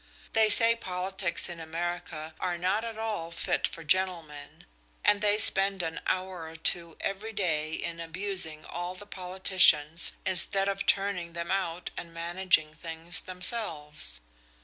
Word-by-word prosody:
They 220 Hz, -1 st, +4 dB
say 230 Hz, +2 st, +6 dB
politics 190 Hz, -3 st, -3 dB
in 175 Hz, -2 st, -8 dB
America 165 Hz, -1 st, -5 dB
are 175 Hz, -1 st, -2 dB
not 190 Hz, +5 st, 0 dB
at 230 Hz, -1 st, -6 dB
all 215 Hz, -7 st, -4 dB
fit 170 Hz, -, -1 dB
for 165 Hz, -, -10 dB
gentlemen, 165 Hz, -5 st, -2 dB, 0.4 s
and 210 Hz, 0 st, +4 dB
they 210 Hz, 0 st, +3 dB
spend 195 Hz, -3 st, +4 dB
an 165 Hz, 0 st, -4 dB
hour 185 Hz, -3 st, -3 dB
or 160 Hz, -, -12 dB
two 165 Hz, 0 st, -1 dB
every 210 Hz, +3 st, -4 dB
day 155 Hz, -6 st, -1 dB
in 170 Hz, +1 st, -4 dB
abusing 165 Hz, -2 st, +1 dB
all 175 Hz, +1 st, -5 dB
the 205 Hz, -, -11 dB
politicians, 180 Hz, -5 st, +3 dB
instead 195 Hz, +1 st, +1 dB
of 200 Hz, 0 st, -3 dB
turning 195 Hz, -4 st, 0 dB
them 170 Hz, +1 st, -5 dB
out 180 Hz, -3 st, -2 dB
and 170 Hz, -, -7 dB
managing 170 Hz, -2 st, 0 dB
things 165 Hz, +2 st, 0 dB
themselves. 165 Hz, -, +3 dB
180 Hz, 145 wpm, -28 LUFS, 165-195 Hz, 0.4 s, say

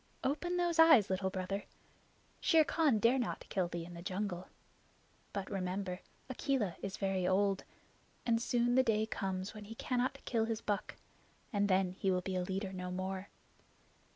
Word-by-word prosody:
Open 330 Hz, +7 st, 0 dB
those 345 Hz, -2 st, +1 dB
eyes, 290 Hz, -, +8 dB
Little 190 Hz, 0 st, 0 dB
Brother. 190 Hz, +1 st, -3 dB, 0.7 s
Shere 325 Hz, -3 st, +5 dB
Khan 305 Hz, -6 st, +3 dB
dare 235 Hz, +5 st, +4 dB
not 245 Hz, -, -3 dB
kill 185 Hz, -3 st, +1 dB
thee 170 Hz, -1 st, -5 dB
in 175 Hz, -, -10 dB
the 170 Hz, -, -8 dB
jungle. 185 Hz, 0 st, -3 dB, 0.8 s
But 200 Hz, 0 st, -4 dB
remember, 185 Hz, -1 st, -2 dB, 0.3 s
Akela 260 Hz, -, 0 dB
is 195 Hz, -1 st, -4 dB
very 190 Hz, -2 st, 0 dB
old, 195 Hz, +1 st, +2 dB, 0.6 s
and 230 Hz, -1 st, +2 dB
soon 240 Hz, 0 st, +2 dB
the 260 Hz, -, +6 dB
day 220 Hz, -3 st, +2 dB
comes 190 Hz, -2 st, -3 dB
when 210 Hz, -1 st, -9 dB
he 225 Hz, +2 st, -8 dB
cannot 250 Hz, +2 st, -1 dB
kill 225 Hz, -2 st, +1 dB
his 225 Hz, -1 st, -2 dB
buck, 205 Hz, -2 st, -2 dB, 0.6 s
and 205 Hz, 0 st, +2 dB
then 185 Hz, -1 st, +3 dB
he 195 Hz, -, +1 dB
will 180 Hz, -1 st, +2 dB
be 185 Hz, 0 st, -2 dB
leader 190 Hz, +2 st, -2 dB
no 180 Hz, -1 st, -4 dB
more. 190 Hz, +1 st, -4 dB
200 Hz, 165 wpm, -34 LUFS, 185-235 Hz, 0.8 s, eyes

